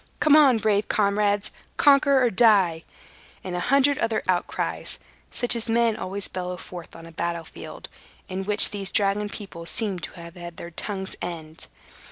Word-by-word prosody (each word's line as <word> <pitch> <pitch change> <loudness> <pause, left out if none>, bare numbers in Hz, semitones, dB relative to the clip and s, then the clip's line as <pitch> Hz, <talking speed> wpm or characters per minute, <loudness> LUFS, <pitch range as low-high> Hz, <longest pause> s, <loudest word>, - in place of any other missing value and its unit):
"Come 300 -1 +5
on, 280 -6 +6
brave 210 -1 +1
comrades! 205 -1 +1 0.3
Conquer 280 -2 +5
or 240 - +2
die!" 190 -6 +4 0.6
and 180 -1 -5
a - - -1
hundred 275 +6 +3
other 225 -1 0
outcries, 180 -1 -2 0.3
such 245 0 +2
as 230 0 -3
men 230 -1 +2
always 200 -1 -5
bellow 180 -1 -5
forth 175 -2 -10
on 165 - -11
a 165 - -12
battle 170 0 -3
field, - - -9 0.4
and 190 +1 -5
which 210 0 +6
these 200 -2 -4
dragon 205 0 +1
people 195 -5 -8
seemed 200 -4 -2
to - - -7
have 170 0 -11
at 175 -1 -9
their 170 - -8
tongues' 190 +2 -4
ends. 160 -2 -7
200 Hz, 170 wpm, -24 LUFS, 175-225 Hz, 0.6 s, on